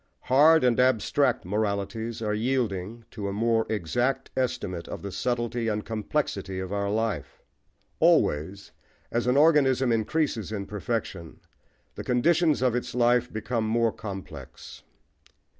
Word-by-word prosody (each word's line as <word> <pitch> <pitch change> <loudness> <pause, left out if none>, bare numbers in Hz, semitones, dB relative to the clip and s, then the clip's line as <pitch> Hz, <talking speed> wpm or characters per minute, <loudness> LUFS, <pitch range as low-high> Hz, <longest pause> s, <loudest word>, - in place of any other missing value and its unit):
Hard 155 +5 +5
and 125 -1 +3
abstract 130 0 +2
moralities 110 +3 -2
are 105 -1 0
yielding 115 -2 -2
to 105 -3 -5
a - - -2
more 115 +2 +1
exact 120 +7 -1
estimate 95 -9 -2
of - - -7
the 100 - -5
subtlety 120 +2 -2
and 105 -1 -2
complexity 105 -4 -3
of 95 +1 -5
our 100 0 -1
life. 105 -8 -3 0.6
Always, 95 +7 +2 0.4
as 120 +1 -1
an 125 +2 +3
organism 135 -5 +4
increases 115 - -1
in 100 -2 -4
perfection, 100 -5 -4 0.5
the - - -7
conditions 155 +4 +2
of 125 -2 +2
its 125 -1 -3
life 120 0 +2
become 110 +1 -2
more 115 0 +2
complex. 100 -4 -9
115 Hz, 130 wpm, -26 LUFS, 100-125 Hz, 0.6 s, Hard